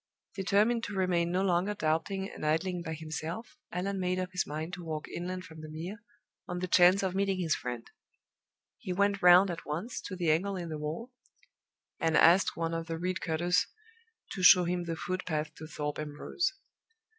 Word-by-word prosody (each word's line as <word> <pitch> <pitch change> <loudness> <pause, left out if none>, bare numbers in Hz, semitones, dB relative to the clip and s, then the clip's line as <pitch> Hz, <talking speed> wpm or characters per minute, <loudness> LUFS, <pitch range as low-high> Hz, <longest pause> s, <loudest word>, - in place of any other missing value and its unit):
Determined 210 +4 +2
to 205 - -6
remain 175 -2 +1
no 185 +2 +1
longer 190 +2 +1
doubting 180 +4 -1
and - - -10
idling 170 +4 0
by 160 -2 -4
himself, 160 - -6 0.2
Allan 195 +2 -2
made 180 0 0
up 185 0 -3
his 180 - -1
mind 155 +4 -5
to 180 -1 -6
walk 155 -2 -4
inland 185 +1 -5
from 160 -1 -11
the 155 - -8
Mere, 175 +8 -6 0.5
on 180 - -4
the 185 +1 -2
chance 180 +2 +6
of 190 -1 0
meeting 195 0 +1
his 165 -3 +1
friend. 120 -2 -4 0.9
He 185 - -4
went 200 +1 +1
round 180 +2 +7
at 170 - -6
once 175 +11 -4
to 185 - -5
the 175 -3 +1
angle 195 +5 +1
in 175 -2 -5
the 155 -1 -4
wall, 160 +12 -5 0.9
and 160 -2 +2
asked 175 +4 +5
one 165 0 -1
of 165 0 -3
the 165 0 -3
reedcutters 180 +1 0 0.6
to 195 - -4
show 180 0 +8
him 175 0 -1
the 165 -1 -3
footpath 160 -4 -3
to 155 - -10
Thorpe 150 -1 -4
Ambrose. 150 - -2
180 Hz, 185 wpm, -30 LUFS, 160-190 Hz, 0.9 s, show